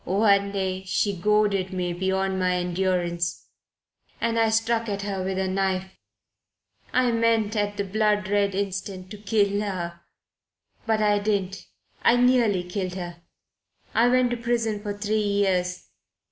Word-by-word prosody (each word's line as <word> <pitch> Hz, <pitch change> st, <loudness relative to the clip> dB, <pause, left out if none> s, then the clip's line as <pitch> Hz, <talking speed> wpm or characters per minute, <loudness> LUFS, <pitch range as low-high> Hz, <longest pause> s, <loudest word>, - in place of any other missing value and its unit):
One 200 Hz, +1 st, +3 dB
day 190 Hz, -1 st, -2 dB
she 200 Hz, +1 st, 0 dB
goaded 205 Hz, 0 st, +1 dB
me 180 Hz, -2 st, -2 dB
beyond 190 Hz, +1 st, -1 dB
my 180 Hz, -1 st, +1 dB
endurance 175 Hz, -1 st, -1 dB, 0.7 s
and 230 Hz, 0 st, 0 dB
I 225 Hz, -1 st, +3 dB
struck 225 Hz, +1 st, +1 dB
at 200 Hz, -1 st, -3 dB
her 195 Hz, -2 st, -3 dB
with 190 Hz, 0 st, -2 dB
a 190 Hz, 0 st, 0 dB
knife. 190 Hz, 0 st, -1 dB, 1.0 s
I 255 Hz, -1 st, +3 dB
meant 230 Hz, -2 st, +1 dB
at 205 Hz, -1 st, -1 dB
the 200 Hz, -, 0 dB
bloodred 205 Hz, -1 st, +1 dB
instant 190 Hz, -1 st, -4 dB
to 210 Hz, -, -8 dB
kill 205 Hz, -1 st, +1 dB
her. 170 Hz, -4 st, -4 dB, 0.9 s
But 220 Hz, -1 st, +2 dB
I 205 Hz, -1 st, +3 dB
didn't. 200 Hz, -2 st, -2 dB, 0.3 s
I 235 Hz, -, +5 dB
nearly 240 Hz, -7 st, +3 dB
killed 180 Hz, 0 st, -4 dB
her. 175 Hz, -2 st, -7 dB, 0.7 s
I 230 Hz, +2 st, +4 dB
went 250 Hz, 0 st, +3 dB
to 240 Hz, -, -1 dB
prison 230 Hz, -3 st, -1 dB
for 205 Hz, -1 st, -4 dB
three 215 Hz, +1 st, 0 dB
years. 190 Hz, -3 st, 0 dB
200 Hz, 145 wpm, -25 LUFS, 185-215 Hz, 1.0 s, I